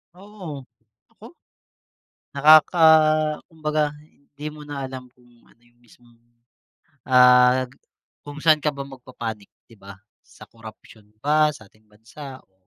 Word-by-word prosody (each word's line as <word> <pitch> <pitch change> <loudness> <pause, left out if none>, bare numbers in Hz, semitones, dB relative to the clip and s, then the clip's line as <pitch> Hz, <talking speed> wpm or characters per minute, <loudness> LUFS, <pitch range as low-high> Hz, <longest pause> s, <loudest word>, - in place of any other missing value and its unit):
Oo, 185 -8 -10 0.5
naku. - - -17 1.0
Nakaka 155 +4 +5 0.7
kumbaga 155 -1 -2
hindi 150 -1 -13
mo 150 - -12
na 140 -2 -6
alam 130 -1 -11
kung 125 -1 -27 0.2
ano 120 - -28
yung 120 0 -33
mismong, 120 0 -24 0.9
ah, 125 0 +4 0.6
kung 145 0 -10
saan 155 -1 +3
ka 150 - +1
ba 140 - -11
magpapanik 120 -5 -9 0.2
'di 115 - -19
ba, 100 0 -13 0.3
sa - - -17
korapsyon 110 -1 -15 0.2
ba, 150 +3 +2
sa 110 -8 -15
ating 110 +2 -30
bansa, 120 +6 -13
o - - -44
130 Hz, 130 wpm, -22 LUFS, 120-150 Hz, 1.0 s, Nakaka